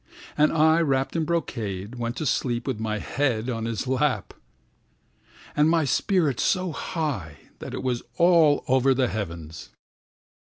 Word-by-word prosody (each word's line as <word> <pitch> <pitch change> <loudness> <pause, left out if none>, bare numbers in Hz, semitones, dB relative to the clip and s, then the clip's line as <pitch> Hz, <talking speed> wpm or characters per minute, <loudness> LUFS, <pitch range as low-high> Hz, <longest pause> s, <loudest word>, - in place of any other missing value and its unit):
And 150 0 +4
I, 160 +1 +4
wrapped 135 -3 0
in 165 -1 0
brocade, 115 - -3
went 120 -1 -4
to 155 - -3
sleep 120 -2 0
with 130 -6 -3
my 110 -1 -2
head 125 0 -1
on 115 -1 -3
his 115 +2 -3
lap, 130 +1 0 1.2
And 150 +1 +4
my 165 -2 +3
spirit 155 +1 +1
so 185 -2 +1
high 130 - -4 0.2
that - - -6
it - - -5
was 125 -2 -1 0.2
all 170 -4 +5
over 130 +1 +3
the 130 -2 +1
heavens. 85 -6 -6
130 Hz, 150 wpm, -25 LUFS, 115-155 Hz, 1.2 s, all